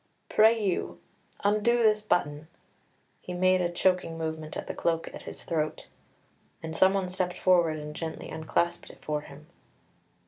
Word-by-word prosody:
Pray, 225 +2 +5
you, 195 -4 -1 0.4
undo 215 +4 +3
this 215 -1 +4
button." 155 -7 0 0.7
He 180 - -6
made 185 +1 +3
a 175 - +1
choking 175 -1 +1
movement 160 -1 -4
at - - -5
the - - -5
cloak 165 -1 -1
at - - -8
his - - -10
throat, 155 -2 -2 0.7
and 160 0 -5
someone 190 +1 +3
stepped 180 -1 -2
forward 175 -4 +3
and 150 0 -7
gently 160 0 -5
unclasped 170 +2 -1
it - - -16
for 150 -1 -1
him. 150 +1 -13
175 Hz, 150 wpm, -28 LUFS, 160-190 Hz, 0.7 s, Pray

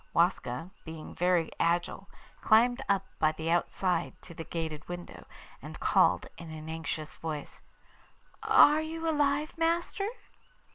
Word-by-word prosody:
Waska, 170 -2 +1
being 160 -1 -8
very 175 -2 +2
agile, 175 +3 0 0.3
climbed 240 +3 +4
up 195 -1 +2
by 155 0 +3
the 160 +1 -3
outside 175 0 0
to 170 - -10
the 165 - -6
grated 160 -2 -5
window, 175 0 -8 0.3
and - - -9
called - - +3
in 170 -1 -9
an 155 0 -8
anxious 160 -1 -4
voice: 155 -3 -6 0.8
'Are 300 +1 +6
you 325 +1 -4
alive, 295 -1 +1
master? 340 +4 0
175 Hz, 130 wpm, -30 LUFS, 160-270 Hz, 0.8 s, Are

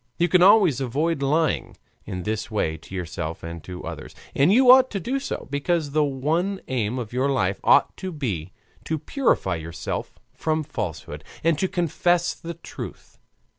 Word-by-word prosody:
You 175 - +3
can 180 +1 +4
always 190 - +6
avoid 145 +5 0
lying 150 +2 0 0.3
in 90 -1 -4
this 110 +3 -3
way 100 -8 -1
to 80 +4 -11
yourself 80 -2 -5
and 85 -1 -7
to 90 -1 -7
others, 80 -2 -7 0.2
and 145 +6 +4
you 250 +3 +7
ought 260 0 +7
to 200 - -3
do 255 +9 -2
so; - - -5
because 145 +1 0
the 155 +1 +3
one 155 +8 0
aim 120 -2 -1
of 120 -3 -5
your 130 +3 +1
life 95 -8 0
ought - - +4
to 190 - -5
be 100 - -3 0.3
to 160 - -1
purify 145 - 0
yourself 80 +1 -5 0.2
from 155 0 -1
falsehood 90 - -5 0.2
and 165 -2 +2
to 190 - +1
confess 175 0 +1
the 170 0 -8
truth. 170 - -9
140 Hz, 170 wpm, -24 LUFS, -, 0.3 s, you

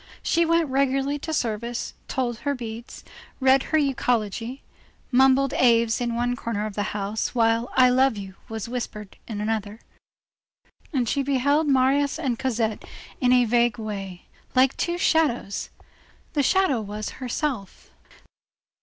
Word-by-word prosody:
She 335 0 +2
went 335 -1 +3
regularly 275 +1 0
to 320 - -5
service, 235 -4 -2
told 240 -3 -2
her 285 -1 -1
beads, 230 -1 -8 0.4
read 265 0 +5
her 315 - +3
euchology, 245 -3 -1 0.5
mumbled 265 +1 +4
Aves 230 -2 +3
in 235 -1 -1
one 245 +1 0
corner 225 -3 -3
of 215 - -5
the 205 0 -2
house, 210 +4 -2
while 230 0 +2
I 255 -1 +6
love 260 -2 +3
you 195 -1 -7 0.2
was 220 -2 -4
being 235 - -9
whispered 210 -5 -5
in 220 - -5
the 225 - +1
other, 215 0 -5 1.1
and 255 -6 0
she 280 - +1
beheld 285 +3 +2
Marius 275 +2 +2
and 265 -7 -2
Cosette 230 -4 -1 0.4
in 250 -2 +3
a 250 -1 +5
vague 235 +1 +2
way, 195 -5 -6 0.3
like 260 +1 +4
two 345 0 -1
shadows. 300 - +1 0.6
The 295 - +2
shadow 285 -4 +2
was 210 +1 -5
herself. 250 -5 -4
245 Hz, 145 wpm, -24 LUFS, 225-275 Hz, 1.1 s, I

